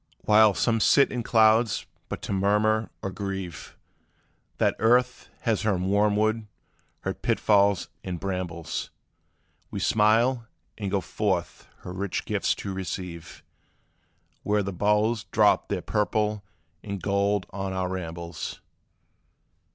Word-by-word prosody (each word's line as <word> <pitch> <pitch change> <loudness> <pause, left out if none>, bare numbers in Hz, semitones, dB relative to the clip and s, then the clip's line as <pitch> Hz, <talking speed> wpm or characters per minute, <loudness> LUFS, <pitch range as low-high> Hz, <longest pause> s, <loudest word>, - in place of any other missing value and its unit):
While 105 -1 +5
some 115 -2 +1
sit 140 +5 +5
in 125 - -2
clouds 110 0 +3 0.2
but - - -5
to - - -3
murmur, 105 +2 +2
or 95 - -2
grieve 95 -6 -6 0.8
That - - +2
earth 125 +2 +2
has 115 -3 0
her 105 -3 +1
wormwood, 105 +3 +1 0.5
her - - -2
pitfalls, 100 -2 +2 0.2
and 90 -2 -4
brambles; 90 -4 -4 0.8
We - - -5
smile, 115 +3 +3 0.3
and 100 -3 -4
go 100 0 0
forth 95 -5 -2
her 90 - -7
rich 95 +1 -3
gifts - - 0
to 100 - -5
receive, 90 -3 -6 1.0
Where 105 0 +1
the 100 0 -4
boughs 105 +4 +1
drop 105 -2 +3
their 95 -3 -3
purple 105 0 0 0.4
and 100 -1 -5
gold 100 0 +1
on 95 -1 -4
our 95 -1 -2
rambles. 85 -2 -5
100 Hz, 120 wpm, -26 LUFS, 95-110 Hz, 1.0 s, While